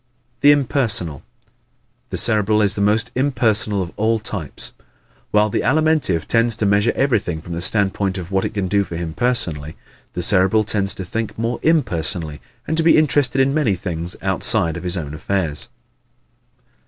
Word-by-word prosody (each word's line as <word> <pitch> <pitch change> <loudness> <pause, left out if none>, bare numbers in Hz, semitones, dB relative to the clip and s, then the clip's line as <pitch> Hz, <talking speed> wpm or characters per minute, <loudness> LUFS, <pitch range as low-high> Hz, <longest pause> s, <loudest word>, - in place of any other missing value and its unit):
The 145 +1 +6
Impersonal 120 - +1
¶ - - -22 0.9
The - - -4
Cerebral 105 -1 +3
is 100 - +3
the 100 - -2
most 110 +4 +1
impersonal 115 -7 +2
of 85 - -9
all 110 +1 +1
types. 100 -8 -4 0.6
While 105 0 +2
the - - 0
Alimentive 155 - +1
tends 115 -1 +2
to 105 - -2
measure 100 +3 +2
everything 105 - 0
from 85 +2 -9
the 85 - -4
standpoint 95 0 +1
of 90 0 -7
what 95 0 0
it - - -4
can 100 -2 -1
do 100 +2 +1
for 85 - -8
him 80 -1 -5
personally, 80 -10 -1 0.4
the 90 - -3
Cerebral 95 +4 +3
tends 100 -2 0
to 95 - -6
think 110 +4 -4
more 115 +2 -2
impersonally 85 - 0 0.2
and 160 - -2
to 165 - +2
be 165 - +5
interested 140 -3 +2
in 135 +1 +2
many 140 -10 +1
things 85 -1 -5
outside 95 -2 0
of 85 - -6
his 90 +1 -2
own 75 -3 -5
affairs. 80 -1 -3
100 Hz, 175 wpm, -19 LUFS, 90-120 Hz, 0.9 s, The